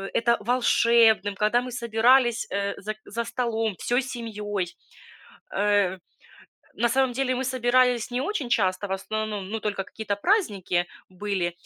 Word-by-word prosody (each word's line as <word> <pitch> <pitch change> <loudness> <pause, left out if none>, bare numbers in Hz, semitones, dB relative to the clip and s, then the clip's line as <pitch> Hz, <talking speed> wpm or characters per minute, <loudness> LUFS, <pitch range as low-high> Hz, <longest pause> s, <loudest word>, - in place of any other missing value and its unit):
это 235 0 +3
волшебным, 230 -2 +3
когда 215 +5 +2
мы 250 0 -7
собирались, 235 +1 +3
э, 200 0 -1
за 215 +2 -4
за 235 +2 -4
столом 225 -4 -1
всей 245 +2 +1
семьёй. 210 -7 -4 0.8
Э, 200 -2 +2 0.8
на 235 +1 +1
самом 260 0 +2
деле 255 0 0
мы 260 - -2
собирались 250 -2 +2
не 245 +1 -1
очень 295 - -2
часто, 195 -3 +1
в - - -3
основном, 210 0 -3
ну, 225 - -3
только 200 -2 -2
какие-то 205 -1 -4
праздники 205 - +1 0.2
были, 185 -2 -2
225 Hz, 140 wpm, -25 LUFS, 205-245 Hz, 0.8 s, это